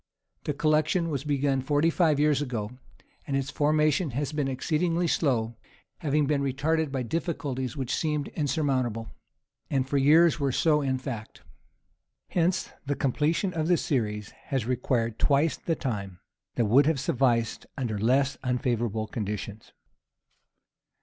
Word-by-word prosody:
The 150 Hz, -, 0 dB
collection 155 Hz, +3 st, +2 dB
was 140 Hz, -2 st, -2 dB
begun 140 Hz, -2 st, +1 dB
forty 145 Hz, +4 st, +2 dB
five 155 Hz, -4 st, +2 dB
years 150 Hz, -1 st, +3 dB
ago, 120 Hz, -6 st, -3 dB, 0.6 s
and 135 Hz, -, 0 dB
its 135 Hz, +1 st, -2 dB
formation 150 Hz, +2 st, +2 dB
has 145 Hz, 0 st, -1 dB
been 150 Hz, -3 st, -1 dB
exceedingly 165 Hz, +6 st, 0 dB
slow, 125 Hz, -8 st, +1 dB, 0.5 s
having 150 Hz, -1 st, +1 dB
been 145 Hz, 0 st, +1 dB
retarded 145 Hz, +3 st, 0 dB
by 135 Hz, -2 st, -2 dB
difficulties 140 Hz, -2 st, -3 dB
which 130 Hz, -2 st, -2 dB
seemed 150 Hz, -2 st, -1 dB
insurmountable, 130 Hz, -7 st, -1 dB, 0.6 s
and 130 Hz, -2 st, 0 dB
for 140 Hz, +1 st, +1 dB
years 155 Hz, +3 st, +5 dB
were 140 Hz, -2 st, +1 dB
so 150 Hz, +3 st, +3 dB
in 135 Hz, -2 st, 0 dB
fact. 120 Hz, -5 st, -7 dB, 0.9 s
Hence 175 Hz, +1 st, 0 dB
the 140 Hz, 0 st, -1 dB
completion 155 Hz, +8 st, 0 dB
of 160 Hz, -2 st, -1 dB
the 175 Hz, -1 st, +4 dB
series 105 Hz, -9 st, -2 dB
has 135 Hz, -5 st, -1 dB
required 115 Hz, -2 st, -1 dB
twice 145 Hz, +2 st, +3 dB
the 165 Hz, -, -2 dB
time 100 Hz, -, -4 dB, 0.4 s
that 120 Hz, -, +2 dB
would 130 Hz, +7 st, +5 dB
have 160 Hz, -4 st, +2 dB
sufficed 125 Hz, -6 st, 0 dB
under 115 Hz, -6 st, -2 dB
less 130 Hz, +5 st, +2 dB
unfavorable 120 Hz, -3 st, -1 dB
conditions. 105 Hz, 0 st, -5 dB
140 Hz, 140 wpm, -27 LUFS, 125-155 Hz, 0.9 s, years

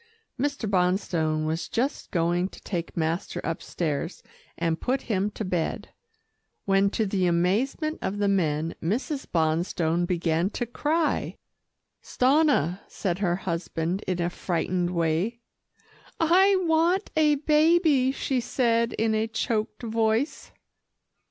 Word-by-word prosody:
Mr. 280 Hz, -4 st, -1 dB
Bonstone 180 Hz, -5 st, +1 dB
was 160 Hz, +2 st, -2 dB
just 260 Hz, +5 st, -2 dB
going 175 Hz, +1 st, +1 dB
to -, -, -13 dB
take 170 Hz, -3 st, -4 dB
master 165 Hz, +2 st, -1 dB
upstairs, 165 Hz, 0 st, -3 dB, 0.3 s
and 165 Hz, -1 st, -1 dB
put 260 Hz, +1 st, 0 dB
him 205 Hz, -3 st, 0 dB
to 210 Hz, 0 st, -5 dB
bed, 175 Hz, -3 st, -2 dB, 0.8 s
when 195 Hz, 0 st, +3 dB
to 220 Hz, +2 st, 0 dB
the 190 Hz, -2 st, +1 dB
amazement 215 Hz, -, 0 dB
of 195 Hz, -, -2 dB
the 205 Hz, 0 st, +1 dB
men, 165 Hz, -4 st, +1 dB
Mrs. 265 Hz, -, -2 dB
Bonstone 165 Hz, +1 st, +1 dB
began 170 Hz, 0 st, +1 dB
to 240 Hz, -, -3 dB
cry. 300 Hz, +6 st, -1 dB, 0.6 s
"Stanna," 255 Hz, -, +2 dB
said 185 Hz, -2 st, -3 dB
her 175 Hz, -4 st, +1 dB
husband 170 Hz, 0 st, -3 dB
in 185 Hz, -1 st, -1 dB
a 175 Hz, 0 st, 0 dB
frightened 175 Hz, 0 st, -1 dB
way. 170 Hz, +6 st, 0 dB, 0.8 s
"I 375 Hz, +5 st, +5 dB
want 335 Hz, +4 st, +2 dB
a 305 Hz, -1 st, +4 dB
baby," 300 Hz, -2 st, +3 dB
she 265 Hz, -1 st, -1 dB
said 235 Hz, -1 st, +1 dB
in 220 Hz, 0 st, +1 dB
a 220 Hz, +1 st, +1 dB
choked 225 Hz, 0 st, -2 dB
voice. 225 Hz, +4 st, 0 dB
195 Hz, 125 wpm, -26 LUFS, 170-255 Hz, 0.8 s, I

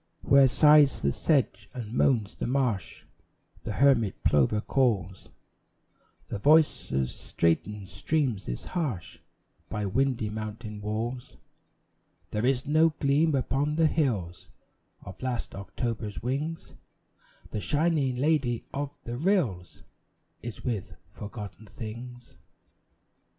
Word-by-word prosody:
Where 140 Hz, -1 st, +6 dB
sighs 150 Hz, +1 st, +6 dB
the 70 Hz, -, +2 dB
sedge 115 Hz, -, 0 dB
and 115 Hz, -3 st, -6 dB
moans 115 Hz, -6 st, +2 dB
the -, -, -4 dB
marsh, 125 Hz, -8 st, -1 dB, 0.6 s
The -, -, -3 dB
hermit 125 Hz, -8 st, +3 dB
plover 75 Hz, +9 st, +3 dB
calls; 105 Hz, -7 st, 0 dB, 1.0 s
The 100 Hz, -, -4 dB
voice 155 Hz, +7 st, +4 dB
of 65 Hz, -1 st, +1 dB
straitened 95 Hz, +9 st, -1 dB
streams 115 Hz, -, -1 dB
is -, -, -4 dB
harsh 140 Hz, -, -4 dB, 0.5 s
By 105 Hz, -1 st, -2 dB
windy 120 Hz, +2 st, +1 dB
mountain 110 Hz, 0 st, -6 dB
walls; 115 Hz, +4 st, -4 dB, 0.9 s
There 105 Hz, +3 st, 0 dB
is 130 Hz, -1 st, +1 dB
no 155 Hz, +3 st, +4 dB
gleam 145 Hz, +2 st, +3 dB
upon 140 Hz, +3 st, 0 dB
the 165 Hz, 0 st, +3 dB
hills 110 Hz, -, -1 dB, 0.5 s
Of -, -, -10 dB
last 130 Hz, -2 st, -3 dB
October's 105 Hz, +2 st, -4 dB
wings; 145 Hz, +6 st, -3 dB, 0.8 s
The 105 Hz, -, -3 dB
shining 145 Hz, -3 st, +1 dB
lady 130 Hz, -3 st, +1 dB
of 145 Hz, +1 st, -4 dB
the 120 Hz, +1 st, -5 dB
rills 140 Hz, -, 0 dB, 0.6 s
Is 120 Hz, -2 st, -7 dB
with 100 Hz, -7 st, -3 dB
forgotten 105 Hz, +2 st, -9 dB
things. 120 Hz, +3 st, -9 dB
120 Hz, 115 wpm, -28 LUFS, 105-140 Hz, 1.0 s, Where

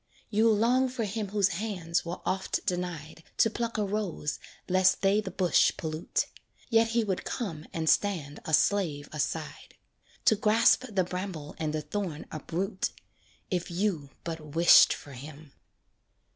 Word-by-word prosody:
You'll 220 Hz, +1 st, +4 dB
long 250 Hz, +5 st, +3 dB
for 250 Hz, -2 st, -3 dB
him 210 Hz, 0 st, -3 dB
whose 200 Hz, -1 st, +2 dB
hands 180 Hz, -4 st, -2 dB
were 170 Hz, +1 st, -6 dB
oft 190 Hz, 0 st, -1 dB
denied 175 Hz, -3 st, -4 dB, 0.2 s
To 225 Hz, -, +4 dB
pluck 235 Hz, 0 st, -3 dB
a 210 Hz, -, +1 dB
rose 195 Hz, -7 st, -3 dB, 0.3 s
lest 185 Hz, +1 st, +3 dB
they 200 Hz, +2 st, +4 dB
the 200 Hz, -, -5 dB
bush 185 Hz, -1 st, +3 dB
pollute 155 Hz, 0 st, -2 dB, 0.5 s
Yet 225 Hz, 0 st, +5 dB
he 230 Hz, 0 st, +1 dB
would 195 Hz, -4 st, -2 dB
come 165 Hz, -, -4 dB
and 160 Hz, -1 st, -3 dB
stand 160 Hz, -7 st, +1 dB
a -, -, -5 dB
slave 155 Hz, -2 st, +2 dB
aside. 155 Hz, +1 st, -4 dB, 0.5 s
To 220 Hz, -, +6 dB
grasp 220 Hz, +4 st, +4 dB
the 195 Hz, -3 st, +1 dB
bramble 180 Hz, -4 st, -5 dB
and 155 Hz, -1 st, -1 dB
the 155 Hz, 0 st, -3 dB
thorn 165 Hz, -1 st, -4 dB
uproot, 185 Hz, +6 st, -2 dB, 0.6 s
If 180 Hz, -2 st, -1 dB
you 175 Hz, -5 st, -1 dB
but 165 Hz, -1 st, -4 dB, 0.2 s
wished 170 Hz, +1 st, +8 dB
for 145 Hz, -, -5 dB
him. 145 Hz, +3 st, -11 dB
185 Hz, 150 wpm, -29 LUFS, 160-210 Hz, 0.6 s, wished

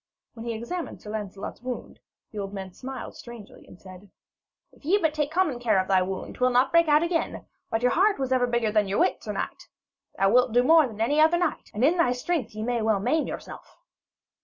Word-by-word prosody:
When 230 Hz, 0 st, -9 dB
he 230 Hz, -, -1 dB
had -, -, -5 dB
examined 345 Hz, +8 st, -5 dB
Sir 210 Hz, -, -9 dB
Lancelot's 205 Hz, -2 st, -6 dB
wound, 250 Hz, -1 st, -6 dB, 0.3 s
the 215 Hz, -, -6 dB
old 195 Hz, 0 st, -5 dB
man 190 Hz, -2 st, -7 dB
smiled 265 Hz, +5 st, -8 dB
strangely, 235 Hz, -4 st, -12 dB
and 180 Hz, -, -15 dB
said: 190 Hz, +1 st, -13 dB, 0.6 s
'If -, -, -24 dB
ye 370 Hz, +8 st, +3 dB
take 300 Hz, -1 st, -1 dB
but -, -, -22 dB
common 320 Hz, -8 st, +1 dB
care 225 Hz, -4 st, +2 dB
of 185 Hz, -, -1 dB
thy 190 Hz, -1 st, +3 dB
wound, 190 Hz, +1 st, -4 dB
'twill 255 Hz, 0 st, +1 dB
not 250 Hz, +1 st, +3 dB
break 335 Hz, -1 st, +4 dB
out 300 Hz, +1 st, +4 dB
again, 340 Hz, -1 st, -2 dB, 0.2 s
but 225 Hz, +1 st, -1 dB
your 250 Hz, -, +4 dB
heart 395 Hz, +4 st, +3 dB
was 265 Hz, -1 st, -3 dB
ever 250 Hz, -1 st, +3 dB
bigger 235 Hz, -3 st, 0 dB
than 210 Hz, -1 st, +2 dB
thy 195 Hz, -, -2 dB
wit, 360 Hz, -, +1 dB
sir -, -, -5 dB
knight. -, -, -5 dB, 0.5 s
Thou 195 Hz, 0 st, +3 dB
wilt 250 Hz, -1 st, +3 dB
do 245 Hz, +1 st, +4 dB
more 315 Hz, +1 st, +6 dB
than 220 Hz, -3 st, -11 dB
any 290 Hz, +7 st, +3 dB
other 320 Hz, +2 st, +5 dB
knight, 345 Hz, -3 st, -2 dB
and 225 Hz, +4 st, +1 dB
in 335 Hz, +5 st, +3 dB
thy 290 Hz, -8 st, +3 dB
strength 250 Hz, -3 st, -3 dB
ye 215 Hz, -, -4 dB
may 240 Hz, 0 st, -1 dB
well 215 Hz, -2 st, +2 dB
maim 310 Hz, +10 st, 0 dB
yourself.' -, -, -9 dB
245 Hz, 235 wpm, -26 LUFS, 215-305 Hz, 0.6 s, more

